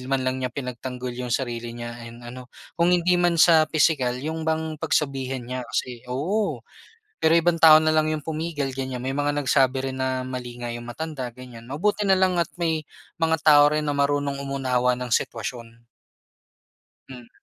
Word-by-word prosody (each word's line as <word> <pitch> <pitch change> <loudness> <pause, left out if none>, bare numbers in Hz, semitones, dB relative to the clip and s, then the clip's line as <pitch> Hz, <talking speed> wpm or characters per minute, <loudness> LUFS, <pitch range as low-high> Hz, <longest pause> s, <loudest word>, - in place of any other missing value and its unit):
man 135 -1 0
lang 130 0 -1
niya 130 - -1
pinagtanggol 125 -1 -6
yung 125 0 -5
sarili 120 -2 -3
niya 120 0 -6 0.2
and 120 +1 -13
ano, 125 +1 -9 0.2
kung 170 0 +2
hindi 180 0 +3
man 175 -1 +2
sa 160 -2 +6
pisikal, 145 -6 +2
yung 160 +5 -4
bang 160 -1 -2
pagsabihan 135 -3 -1
niya 125 +1 -4
kasi 125 0 -4
oo 180 +12 -1 0.5
pero 160 - +2
ibang 170 +1 +3
tao 155 -1 +8
na 155 - +1
lang 155 0 +2
yung 155 - -2
pumigal 155 -2 -3
ganyan, 130 -2 -4
may 135 +2 -3
mga 145 0 0
nagsabi 135 -1 +2
rin 130 - -6
na 130 -1 -2
mali 125 -1 -6
nga 120 - -4
yung 120 0 -6
matanda 130 -1 -5
ganyan 125 -2 -12
mabuti 185 - -1
nalang 190 -2 +3
at 170 - 0
may 160 -2 0 0.3
mga 160 -1 +1
tao 150 -2 +7
rin 150 0 -1
na 145 - -1
marunong 140 0 0
umunawa 130 -2 0
ng 125 0 -4
sitwasyon. 115 0 -3 1.2
Mhm. 125 -3 -11
135 Hz, 175 wpm, -24 LUFS, 125-160 Hz, 1.2 s, tao